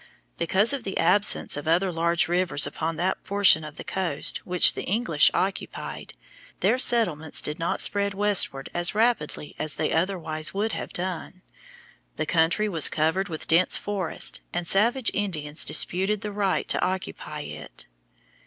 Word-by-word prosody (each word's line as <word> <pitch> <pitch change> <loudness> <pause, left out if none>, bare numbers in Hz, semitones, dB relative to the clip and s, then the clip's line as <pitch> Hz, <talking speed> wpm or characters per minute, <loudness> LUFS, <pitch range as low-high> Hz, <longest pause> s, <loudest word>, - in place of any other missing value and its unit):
Because 190 - +1
of 270 -4 -3
the 195 - -4
absence 185 +5 +3
of 145 +2 -6
other 180 +3 +2
large 170 +1 0
rivers 175 -3 +3
upon 160 +3 -4
that 180 +4 -2
portion 200 -5 +4
of 150 -1 -9
the - - -8
coast 180 -7 -2
which 180 -1 +5
the - - -5
English 190 -7 +2
occupied, 190 +1 -4 0.5
their 255 - +2
settlements 175 - +2
did 150 +2 -2
not 165 - 0
spread 200 -1 +2
westward 195 -9 +2
as 175 +3 0
rapidly 215 -10 -1
as 155 -1 -2
they - - -1
otherwise 165 -2 -2
would 215 +3 -1
have - - -5
done. 185 +1 -5 0.7
The - - -2
country 170 +5 +2
was 165 -7 +3
covered 160 +5 0
with 160 -2 -6
dense 170 +3 +3
forests, 195 -5 -1
and 175 0 -3
savage 225 +7 +2
Indians 155 -7 -2
disputed 195 +3 0
the 210 - -5
right 200 -2 -1
to - - -1
occupy 185 0 -4
it. - - -9
180 Hz, 155 wpm, -25 LUFS, 160-200 Hz, 0.7 s, which